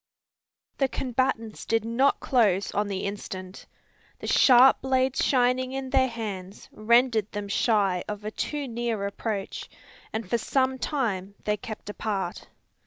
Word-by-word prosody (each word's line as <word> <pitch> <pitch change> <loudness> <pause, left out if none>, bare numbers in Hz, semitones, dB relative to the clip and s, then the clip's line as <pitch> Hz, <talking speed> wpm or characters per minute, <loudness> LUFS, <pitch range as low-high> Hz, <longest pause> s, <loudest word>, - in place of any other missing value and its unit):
The 270 - +3
combatants 250 -4 -2
did 225 -1 0
not 250 +5 +2
close 205 -7 +2
on 205 0 0
the 195 -2 -3
instant. 190 -2 -6 0.5
The - - -9
sharp 255 0 +6
blades 260 0 +1
shining 255 0 +2
in 265 -1 -4
their 260 -1 +4
hands 205 -5 -6
rendered 230 -1 +2
them 205 0 -4
shy 200 -3 +1
of 210 0 -6
a 215 - -3
too 290 +4 -3
near 230 -3 -2
approach, 200 0 -4 0.4
and 220 -2 -4
for 235 +5 0
some 260 +2 0
time 205 -10 -2
they 210 - +1
kept 215 -1 -8
apart. 200 -4 -4
225 Hz, 140 wpm, -26 LUFS, 200-255 Hz, 0.5 s, sharp